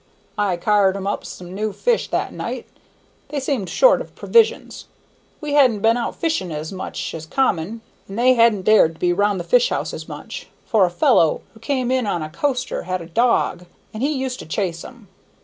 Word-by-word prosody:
I 195 -4 +1
car'd 200 +1 +2
'em 195 - -6
up 200 - -2
some 180 0 -9
new 215 +2 -2
fish 475 - 0
that - - -2
night; - - -5 0.6
they 295 - -2
seemed 260 - -2
short - - +4
of - - -11
provisions. 460 -1 +1 0.6
We 300 -1 -3
hadn't 255 -8 +4
been 225 +1 +4
out 240 -1 -3
fishing 315 - -1
as 155 +1 -5
much 190 - -5
as 160 -1 -7
common, 225 -1 0 0.3
and 195 - -8
they 255 +2 +5
hadn't 230 -5 +3
dared 185 -6 +4
to - - -21
be 175 -1 +2
round 205 +1 +1
the - - -3
fish - - +3
houses - - -4
much, - - -8 0.2
for 215 -5 +3
a - - -3
fellow 170 -2 +3
who 220 - -17
came 255 +1 -1
in 255 -4 +1
on 175 -5 -1
a 155 - -7
coaster 270 - -2
had 185 -1 -3
a - - -10
dog, 180 -2 +1 0.3
and 215 - -6
he 285 +3 +1
used 265 -2 -3
to - - -9
chase 165 +1 -2
'em. 245 -5 -13
210 Hz, 200 wpm, -21 LUFS, 180-255 Hz, 0.6 s, they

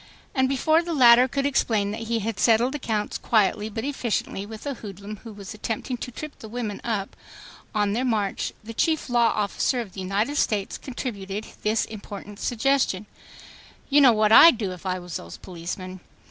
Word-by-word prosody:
And 260 -1 +2
before 310 +5 +3
the 340 -1 -3
latter 245 -1 +7
could 275 +2 -2
explain 220 -7 +1
that 225 +1 -5
he 230 -1 0
had 220 0 -3
settled 235 +3 +3
accounts 220 -7 -2
quietly 210 -1 +2
but 220 +1 -5
efficiently 235 -7 -2
with 220 +3 -9
a 285 - -2
hoodlum 205 -2 -8
who 225 +2 -11
was 205 0 -9
attempting 225 +4 -3
to 245 - -6
trip 305 +5 -8
the 220 - -9
women 225 -3 -4
up 210 -4 -3 0.6
on 205 -1 +1
their 240 +4 0
march, 215 -6 -1
the 230 +2 -8
chief 315 +4 0
law 235 -2 +4
officer 210 +4 0
of 215 -6 -6
the 195 - -8
United 205 +10 -1
States 205 -7 0
contributed 210 -6 -5 0.2
this 215 +1 +1
important 205 -1 -9
suggestion: 245 -5 +1 0.9
"You 290 +1 +6
know 265 -3 +8
what 215 -1 +2
I'd 290 +3 +9
do 205 -4 -2
if 180 +1 -8
I 185 0 0
was 175 -3 -6
those 85 - -10
policemen. 185 +1 -7
220 Hz, 185 wpm, -25 LUFS, 200-250 Hz, 0.9 s, I'd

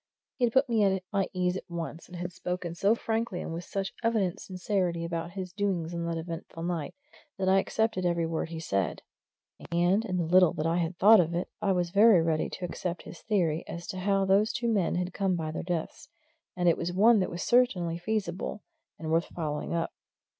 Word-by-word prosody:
He 250 - +3
had 230 - -1
put 270 +1 +4
me 225 -3 +2
at 190 -2 +2
my 195 -1 +1
ease 180 -1 0
at 185 - -7
once; 165 -2 -6
he 180 - -11
had 175 +1 -4
spoken 180 -1 -4
so 200 +6 +3
frankly 225 -5 -2
and - - -5
with 170 +1 -5
such 195 -1 -3
evident 215 -6 +1
sincerity 180 -3 -2
about 170 0 -4
his 185 -2 -6
doings 185 -5 -1
on 170 0 -3
that 165 -1 -2
eventful 165 0 -6
night, 170 -4 -3 0.4
that 190 -1 -1
I 190 +1 +5
accepted 220 -1 0
every 170 -1 +1
word 160 0 -2
he 165 -1 -5
said. 100 - -1 0.7
And 175 +5 +3
in 185 -5 -2
the 175 - +1
little 180 +1 +5
that 155 - -3
I 165 +1 +1
had 170 0 -1
thought 215 +3 +8
of 170 -1 +1
it 175 - -2
I 195 - +2
was 175 -1 -1
very 205 0 +7
ready 160 -1 0
to 180 - -5
accept 175 0 -4
his 170 - -11
theory 175 -8 0
as 170 0 -6
to 185 - -4
how 195 +1 +2
those 200 +4 +3
two 235 -1 -1
men 190 -5 +1
had 180 0 -2
come 190 -2 +1
by 160 -2 -3
their 155 - -4
deaths 175 -2 -4 0.5
and 175 -1 +1
it 170 - +4
was 170 +1 -2
one 215 +5 +5
that 185 - 0
was 175 - -4
certainly 185 -9 +2
feasible, 195 0 -3 0.3
and 160 0 -5
worth 165 +1 +3
following 155 -1 -3
up. 165 0 -1
180 Hz, 220 wpm, -29 LUFS, 170-195 Hz, 0.7 s, thought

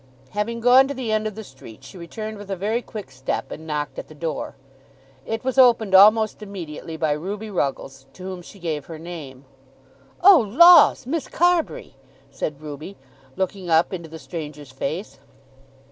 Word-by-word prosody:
Having 230 +3 -3
gone 255 +3 +6
to 280 - -5
the 250 -4 -3
end 215 0 0
of 215 - -6
the 220 - -7
street, 130 - -14
she 135 - -13
returned 215 +5 -7
with 205 -1 -11
a 195 - -2
very 215 +6 -1
quick 210 - -9
step 130 0 -4
and 160 +1 -8
knocked 150 -1 -3
at - - -8
the 155 - -14
door. 160 +1 -4 0.7
It 225 0 -3
was 260 +1 0
opened 230 -6 +5
almost 215 +3 +6
immediately 165 -6 -7
by 155 -1 0
Ruby 200 +8 -4
Ruggles, 135 -5 -3
to 185 - -12
whom 185 -1 -6
she 185 - -14
gave 160 -6 -4
her 165 - -8
name. 155 -6 -9 0.8
"Oh 385 -3 +9
laws, 285 - +6
Miss 310 +4 -3
Carbury!" 350 - 0 0.3
said 140 0 -4
Ruby, 150 +6 -8 0.4
looking 190 -1 -3
up 165 +3 +3
into 170 -3 -6
the 160 - -9
stranger's 150 -4 -8
face. 140 +2 -5
185 Hz, 175 wpm, -22 LUFS, 155-220 Hz, 0.8 s, Oh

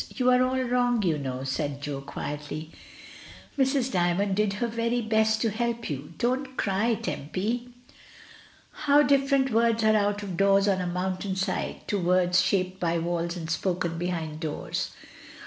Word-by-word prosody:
"You 255 -1 +3
are 250 0 +5
all 260 +1 +1
wrong, 245 -2 +1
you 160 -5 +1
know," 130 -2 -4
said 140 +1 -2
Jo 140 -1 -4
quietly. 150 +3 -6 0.8
"Mrs. 265 -1 +1
Dymond 185 +2 +1
did 210 -1 +1
her 210 +4 -1
very 230 +1 0
best 220 0 +2
to 225 - +1
help 235 -2 -2
you. 145 +4 -6
Don't 260 +2 -1
cry, 210 +4 +1
Tempy." 225 - -3 1.0
How 290 0 +4
different 275 -1 +3
words 230 0 +2
are 215 0 +5
out 205 0 +1
of 185 -4 -5
doors 195 0 +4
on 190 -2 +2
a 180 - -2
moun 185 +1 -2
tain 190 -1 -3
side 190 0 -3
to 205 - 0
words 180 0 +3
shaped 185 0 0
by 170 -1 +1
walls 170 +1 -2
and 165 -2 -5
spoken 170 -1 -1
be 175 - -1
hind 160 -3 -3
doors! 155 -2 -3
195 Hz, 165 wpm, -27 LUFS, 170-235 Hz, 1.0 s, are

